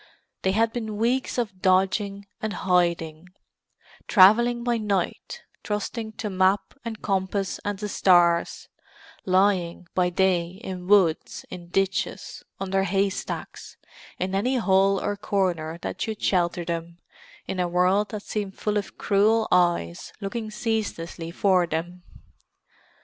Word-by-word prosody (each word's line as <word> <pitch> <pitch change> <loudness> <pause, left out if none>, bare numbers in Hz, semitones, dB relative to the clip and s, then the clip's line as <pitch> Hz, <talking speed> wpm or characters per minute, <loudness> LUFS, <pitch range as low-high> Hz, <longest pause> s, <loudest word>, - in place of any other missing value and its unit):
They 190 - +1
had 225 +2 +2
been 220 -3 -4
weeks 245 +5 0
of 200 -6 -3
dodging 195 +2 +1 0.2
and 215 -1 -2
hiding; 175 -2 0 0.8
travelling 235 +5 +5
by 240 -1 +1
night, 205 - -2 0.2
trusting 220 +1 -4
to 215 - -5
map 190 0 +1
and 225 -2 -6
compass 195 0 -1
and 205 -1 -2
the 210 +1 -4
stars; 175 -4 +3 0.6
lying 185 -2 +2
by 180 -1 +2
day 180 0 0
in 180 -3 -6
woods, 185 -6 +2
in 175 -2 -8
ditches, 195 +2 -2 0.2
under 195 0 0
haystacks—in 195 -1 -4
any 240 +7 +1
hole 195 -3 +3
or 205 - -2
corner 180 -6 -1
that - - -5
should 220 -2 -3
shelter 175 -2 +1
them 170 0 -4 0.5
in 190 - -4
a 180 - +1
world 180 +4 +2
that 210 -1 -6
seemed 205 -3 -4
full 210 0 -1
of 205 - -5
cruel 215 +2 +2
eyes 175 - +1
looking 215 +2 -4
ceaselessly 210 -7 -3
for 180 0 +2
them. 175 +3 -4
195 Hz, 130 wpm, -25 LUFS, 180-210 Hz, 0.8 s, travelling